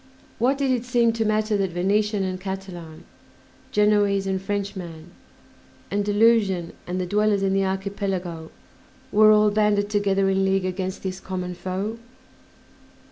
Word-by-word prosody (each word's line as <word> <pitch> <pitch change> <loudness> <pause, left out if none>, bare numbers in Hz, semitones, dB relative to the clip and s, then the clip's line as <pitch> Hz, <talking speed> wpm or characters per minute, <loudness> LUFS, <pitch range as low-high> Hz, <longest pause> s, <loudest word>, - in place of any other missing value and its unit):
What 260 +4 +2
did 275 -2 +1
it 245 -2 0
seem 240 -2 +2
to 225 -1 -1
matter 215 0 +1
that 190 -3 -1
Venetian 205 +3 +1
and 185 -1 -3
Catalan, 185 -4 -7 0.7
Genoese 205 -2 +3
and 190 -1 -1
Frenchman, 190 -5 -5 0.8
Andalusian 205 -3 +2
and 180 +1 -2
the 185 - -1
dwellers 205 +1 +1
in 195 0 +1
the 195 0 +2
Archipelago, 190 -4 -3 0.6
were 215 +1 +6
all 210 0 +5
banded 205 -1 +1
together 195 -2 +2
in 195 0 +2
league 190 -1 +1
against 185 0 -4
this 190 -1 -4
common 180 -1 -5
foe? 190 +5 -4
195 Hz, 135 wpm, -24 LUFS, 185-210 Hz, 0.8 s, were